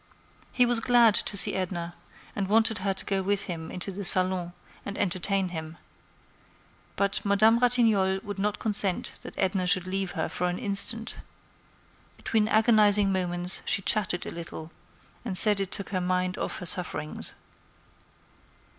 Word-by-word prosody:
He 250 - +3
was 240 -1 +3
glad 235 -2 +4
to 200 - 0
see - - +4
Edna, 175 -2 -4 0.4
and 200 -2 -3
wanted 220 0 +2
her 195 +1 -1
to 190 - -4
go 195 -1 -1
with 200 +1 -1
him 165 -4 -7
into 185 +2 -5
the 200 +2 -7
salon 185 -1 +1 0.3
and 200 - -7
entertain 190 0 -1
him. 160 -1 -8 1.2
But 200 0 -1
Madame 215 +3 +3
Ratignolle 225 -6 +2
would 205 -1 -7
not 210 +1 -1
consent 200 -4 +3
that - - -11
Edna 185 -1 -1
should 180 0 +1
leave 190 -1 -4
her 160 -4 -3
for 180 0 -3
an 175 - -4
instant. 215 +3 0 1.0
Between 215 -2 -1
agonizing 210 -3 +4
moments, 180 -1 0
she 205 -5 +1
chatted 185 -4 0
a - - -6
little, 165 -1 -9 0.5
and 200 -6 0
said 210 0 +5
it 195 0 -4
took 200 - -2
her 185 -2 -2
mind 180 +1 -1
off - - -4
her 180 - -8
sufferings. 175 -4 -1
195 Hz, 155 wpm, -26 LUFS, 180-210 Hz, 1.2 s, said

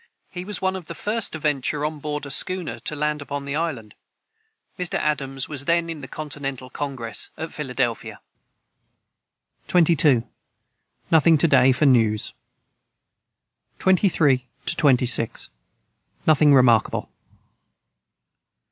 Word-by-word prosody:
He 180 -1 -7
was 205 -2 -4
one 190 0 0
of 185 -3 -7
the - - -8
first 220 +1 0
to - - -3
venture 150 -1 -1
on 155 0 -4
board 150 0 -4
a 140 - -5
schooner, 185 +3 +1
to 150 - -2
land 150 0 -2
upon 145 0 -6
the 140 +1 -4
island." 145 -10 -4 0.9
Mr. 180 -1 -2
Adams 135 -3 -2
was 140 -2 -3
then 170 +1 +1
in 155 -3 -8
the 135 - -8
Continental 135 -4 -6
Congress, 130 -6 -4
at 160 +1 -6
Philadelphia.] 130 -5 -3 1.5
22. 155 -8 +3 0.9
Nothing 160 0 +5
to 165 - +3
day 130 -3 +5
for 130 +4 +1
news. 115 -5 +2 1.4
23 165 -9 +2 0.3
26. 125 -5 +2 0.8
Nothing 155 -1 +4
remarkable. 120 -4 +2
145 Hz, 120 wpm, -22 LUFS, 130-160 Hz, 1.5 s, Nothing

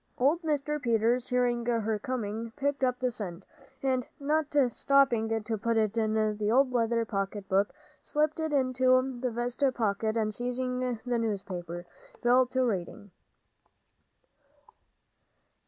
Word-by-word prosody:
Old 290 +7 +2
Mr. 300 -2 -1
Peters, 235 +1 +1
hearing 245 -1 +1
her 225 -2 0
coming, 225 -1 -4
picked 285 -1 -1
up 250 -1 +1
the 255 -1 0
cent, 190 -5 -7 0.4
and, 260 -2 0
not 300 +1 +1 0.2
stopping 230 -4 +2
to 220 0 -2
put 230 +2 0
it 215 -1 +1
in 220 -1 +1 0.2
the 210 0 +1
old 260 +2 +4
leather 230 -1 +1
pocket 195 -1 -3
book, 195 +1 +2 0.3
slipped 305 +1 0
it 315 -1 -1
into 255 -2 +3
his 255 -1 -3
vest 240 +4 -3
pocket, 220 0 0
and 215 -1 0
seizing 250 +2 -2 0.3
the 245 -1 0
newspaper, 180 -5 -4 0.4
fell 250 +1 +5
to 260 +1 0
reading. 205 -1 -3
240 Hz, 135 wpm, -29 LUFS, 220-255 Hz, 0.4 s, fell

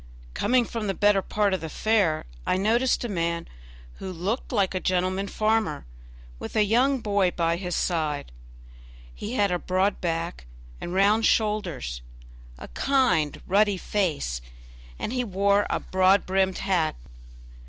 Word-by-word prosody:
Coming 250 - +2
from 225 -2 -4
the 195 - -1
better 205 -1 +3
part 205 0 0
of 190 - -1
the 160 - -5
fair, 200 -4 +1 0.2
I - - +1
noticed 235 +7 +2
a - - -2
man 170 -4 -2 0.5
who 190 - -6
looked 190 +8 -3
like 200 -6 +1
a 185 - -1
gentleman 185 +2 0
farmer, 215 -8 0 0.5
with - - -7
a 215 - +4
young 250 +5 +2
boy 200 -3 +2
by 170 -1 0
his 180 -1 -3
side; 155 - -1 0.8
he 215 - -6
had 205 -5 +2
a 180 - 0
broad 185 +3 0
back 165 - -3 0.3
and 175 - -5
round 210 +3 +4
shoulders, 180 - -1 0.6
a - - -9
kind, 180 - +1
ruddy 205 +1 +3
face, 155 - -1 0.6
and 230 - -4
he 250 -1 0
wore 200 -1 +2
a - - 0
broad 185 +1 +3
brimmed 190 0 +1
hat. 185 -5 0
195 Hz, 150 wpm, -25 LUFS, 175-215 Hz, 0.8 s, a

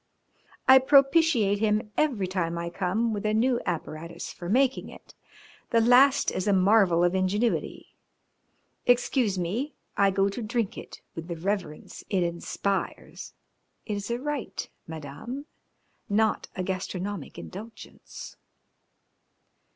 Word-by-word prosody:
I 265 0 +9
propitiate 275 -6 +4
him 210 0 0
every 260 -11 +1
time 175 -2 -2
I 170 0 -4
come 205 +6 0
with 205 - -3
a 215 0 +1
new 240 +2 +2
apparatus 165 -1 -5
for 175 -1 -7
making 260 +4 +2
it. - - -14 0.6
The 230 - +3
last 255 +4 +5
is 185 - -3
a 205 - +4
marvel 190 -3 +4
of 175 0 +3
ingenuity. 195 +5 -1 0.9
Excuse 245 -4 +2
me, 215 - -2 0.2
I 200 -1 +4
go 195 +1 +2
to 200 +4 -4
drink 225 -1 -2
it - - -10
with 165 0 -7
the 170 - -4
reverence 175 -3 -4
it 190 -4 +1
inspires. 175 +3 -3 0.5
It 215 - -3
is 205 +1 -4
a 235 - 0
rite, 290 -1 -4 0.2
Madame, 160 - -7 0.6
not 220 +2 +1
a 185 - -2
gastronomic 185 -1 -4
indulgence." 220 +4 -10
205 Hz, 130 wpm, -27 LUFS, 185-240 Hz, 0.9 s, I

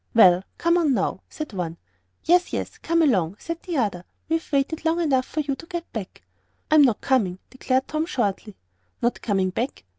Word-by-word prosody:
"Well, 185 -5 +7
come 340 +1 +3
on 300 -6 +2
now," 190 -2 -1
said 305 -7 -6
one. 170 -3 -3 0.5
"Yes 355 +2 +4
yes - - -4
come 335 0 +2
along," 190 - +2
said 335 +6 -5
another; 215 - -1 0.3
"we've 325 0 -1
waited 285 +3 0
long 325 +1 +1
enough 270 -6 +1
for 310 - -2
you 280 -2 -2
to 330 - -12
get 345 -1 -6
back." 205 -4 -7 0.5
"I'm 310 -1 +7
not 250 -7 +3
coming," 210 -10 +1
declared 260 0 0
Tom, 310 +2 -1
shortly. 210 - -2 0.4
"Not 240 +1 0
coming 195 -4 0
back? 245 +8 -3
265 Hz, 180 wpm, -24 LUFS, 200-320 Hz, 0.5 s, Well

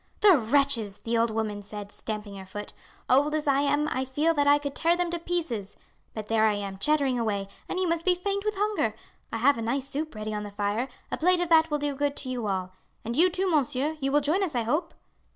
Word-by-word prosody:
"The 405 -4 +8
wretches!" 235 -5 +2
the 230 +1 -3
old 230 0 +3
woman 215 -2 -2
said, 205 0 -8
stamping 210 -2 -5
her 190 - -9
foot. 205 +2 -7 0.3
"Old 290 +4 +3
as 310 - -1
I 280 -1 +3
am 290 +1 +1
I 260 -3 -1
feel 290 +5 +1
that 290 -2 +1
I 290 0 +7
could 285 -1 -5
tear 335 +3 +2
them 355 -1 -1
to 345 - -2
pieces. 315 - -3 0.4
But 215 -1 -4
there 220 -1 +3
I 215 -1 +3
am 200 -1 -5
chattering 280 -1 +2
away, 205 -4 -1 0.2
and 370 - -2
you 370 - +1
must 335 0 0
be 365 0 +3
faint 400 +2 -2
with 425 0 -1
hunger. 405 - 0 0.4
I - - -2
have 255 +2 +3
a - - -3
nice 255 +4 -2
soup 305 -1 -4
ready 215 0 -4
on 210 - -2
the 205 - -6
fire, 205 +4 -1 0.2
a - - -2
plate 360 +2 +4
of 350 -1 -1
that 325 -1 +5
will 300 - +1
do 290 -1 -2
good 285 +1 -1
to 260 - -2
you 245 -4 -3
all. 185 -2 -2 0.3
And 235 +1 -3
you 350 +6 +6
too, 370 +2 -1
monsieur, 295 -2 +1
you 275 -1 -1
will 295 +1 +4
join 310 +7 +1
us, 325 -8 -2
I 240 - +1
hope?" 310 +9 -1
275 Hz, 250 wpm, -27 LUFS, 220-320 Hz, 0.4 s, The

